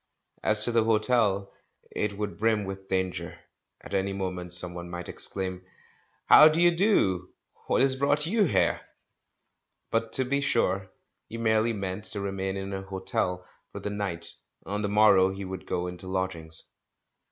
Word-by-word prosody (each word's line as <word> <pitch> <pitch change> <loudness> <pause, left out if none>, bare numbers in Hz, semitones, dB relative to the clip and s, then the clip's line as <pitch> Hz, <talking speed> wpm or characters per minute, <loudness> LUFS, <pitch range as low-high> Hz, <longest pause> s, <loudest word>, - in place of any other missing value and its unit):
As 105 0 +2
to 120 - +1
the 115 -1 +3
hotel, 110 -3 +2 0.4
it 105 -1 -2
would 105 -1 -4
brim 110 -1 +2
with 95 0 -7
danger: 95 -1 -2 0.4
at - - -11
any 95 0 0
moment 90 -2 -4
someone 90 0 -4
might 85 0 -6
exclaim, 95 -1 -5 0.6
"How 150 - +9
d'ye 170 +3 +4
do? 170 - +2 0.2
— - - -32
what - - +2
has 135 0 +3
brought 145 +3 +2
you 210 +4 +2
here?" 155 - +1 1.1
But, 115 0 0
to 130 - +4
be 140 +2 0
sure, 95 -7 0 0.4
he 115 - -6
merely 110 0 +2
meant 100 0 -4
to 105 - -1
remain 95 -1 -3
in 95 0 -5
an 95 0 -5
hotel 95 -1 -2 0.3
for - - -7
the 105 - -4
night 90 -5 -3 0.2
— - - -37
on 105 +1 -3
the 100 - -1
morrow 100 -3 +5
he 95 0 -6
would 95 0 -7
go 90 - -1
into 90 +1 -7
lodg 95 0 -1
ings. 80 -1 -6
100 Hz, 170 wpm, -27 LUFS, 95-115 Hz, 1.1 s, How